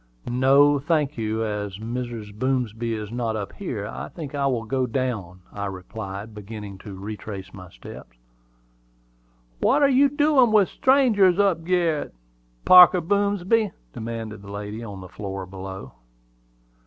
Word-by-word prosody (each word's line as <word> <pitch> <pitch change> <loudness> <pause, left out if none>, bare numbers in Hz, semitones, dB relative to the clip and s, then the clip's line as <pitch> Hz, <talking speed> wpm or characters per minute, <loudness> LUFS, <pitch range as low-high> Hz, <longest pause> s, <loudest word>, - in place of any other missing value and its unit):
"No, 140 +4 +4
I - - -10
thank 150 -1 0
you; 110 0 -2
as 105 -2 -4
Mrs. 115 -1 -5
Boomsby 115 -1 -1
is 105 -1 -6
not 115 -2 -2
up 105 -2 -5
here, - - -5
I 65 +4 -6
think 150 -4 -8
I 140 -1 0
will 120 -4 -1
go 130 +3 -1
down," 110 -8 -3
I 100 0 -3
replied, 100 +2 -7
beginning 105 -1 -8
to 100 -1 -9
retrace 100 -1 -7
my 90 -2 -11
steps. - - -12 1.4
"What 290 +1 +3
are 280 - +6
you 275 +1 +5
doin' 290 -4 +3
with 210 -3 +4
strangers 230 -9 +4
up 195 -5 +2
gerret, 170 - 0 0.5
Parker 180 0 +9
Boomsby?" 200 +3 +1 0.2
demanded 110 -2 -6
the 100 - -12
lady 105 +2 -6
on 100 -4 -8
the 90 - -9
floor 95 0 -6
below. 95 +1 -8
115 Hz, 145 wpm, -24 LUFS, 100-165 Hz, 1.4 s, Parker